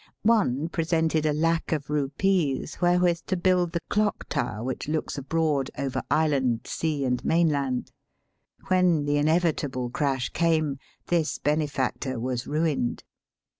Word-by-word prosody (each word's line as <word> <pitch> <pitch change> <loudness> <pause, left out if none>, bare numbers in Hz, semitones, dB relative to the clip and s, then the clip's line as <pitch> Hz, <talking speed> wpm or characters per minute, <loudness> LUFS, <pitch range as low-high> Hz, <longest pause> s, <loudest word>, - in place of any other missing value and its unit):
One 190 - +2
presented 160 -2 +1
a - - +2
lac 165 +2 0
of 150 -3 -2
rupees 150 +2 0
wherewith 175 -1 +3
to 185 - 0
build 180 -1 +2
the 170 - -1
clock 210 +1 -1
tower 120 -3 -2
which 130 +2 -4
looks 155 +1 -2
abroad 145 -1 0
over 135 -2 -2
island, 135 -7 +2
sea, 150 -4 -2
and 125 -1 -1
mainland. 145 -6 +1 0.8
When 180 -5 +3
the 145 0 +1
inevitable 145 -5 +1
crash 135 -3 0
came, 155 -4 +1 0.3
this 165 -3 0
benefactor 140 -4 -1
was 125 +1 -3
ruined. 150 -5 -1
150 Hz, 130 wpm, -26 LUFS, 135-165 Hz, 0.8 s, wherewith